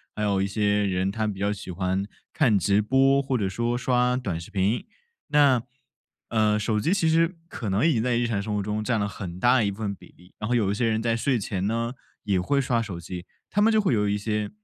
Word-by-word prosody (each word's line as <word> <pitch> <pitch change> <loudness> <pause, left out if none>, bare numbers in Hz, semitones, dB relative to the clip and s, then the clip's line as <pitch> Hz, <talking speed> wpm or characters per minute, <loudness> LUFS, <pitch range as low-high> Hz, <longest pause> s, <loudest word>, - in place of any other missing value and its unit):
还 105 - -2
有 100 -2 +1
一 100 - +1
些 105 0 +1
人 95 0 0
他 110 0 -1
比 95 -2 -4
较 100 +1 0
喜 100 -2 -9
欢 95 +2 -1 0.3
看 120 -10 +3
直 100 +3 +2
播 135 +4 +3
或 135 -2 -1
者 100 -3 0
说 120 +5 -1
刷 125 0 +1
短 95 -10 -3
视 85 - -10
频。 105 +3 0 0.4
那， 140 -5 +4 0.7
呃， 110 -1 +2
手 105 0 0
机 160 - 0
其 195 -4 +2
实 165 +2 +2
可 110 - -5
能 100 +10 +2
已 165 - +3
经 115 - +1
在 120 -1 +1
日 120 - +1
常 110 -4 -1
生 105 +1 -3
活 100 - -1
中 105 +1 -2
占 115 -2 0
了 100 - 0
很 90 -4 -7
大 125 +4 +4
一 100 - +1
部 100 - -6
分 105 -3 -2
比 - - -15
例， 90 +2 -20
然 105 - -3
后 125 - +2
有 105 -5 +2
一 - - 0
些 115 +2 +1
人 110 0 +1
在 115 -1 +1
睡 125 +2 +1
前 100 -2 -2
呢， 115 +2 -1 0.3
也 100 -3 +1
会 140 +10 +1
刷 125 -3 +1
手 95 -6 -5
机， 90 +1 -8 0.2
他 205 - +2
们 220 +2 +5
就 220 - +4
会 200 -10 +2
有 105 -2 +1
一 105 - +1
些 105 0 -2
105 Hz, 275 characters per minute, -25 LUFS, 100-125 Hz, 0.7 s, 们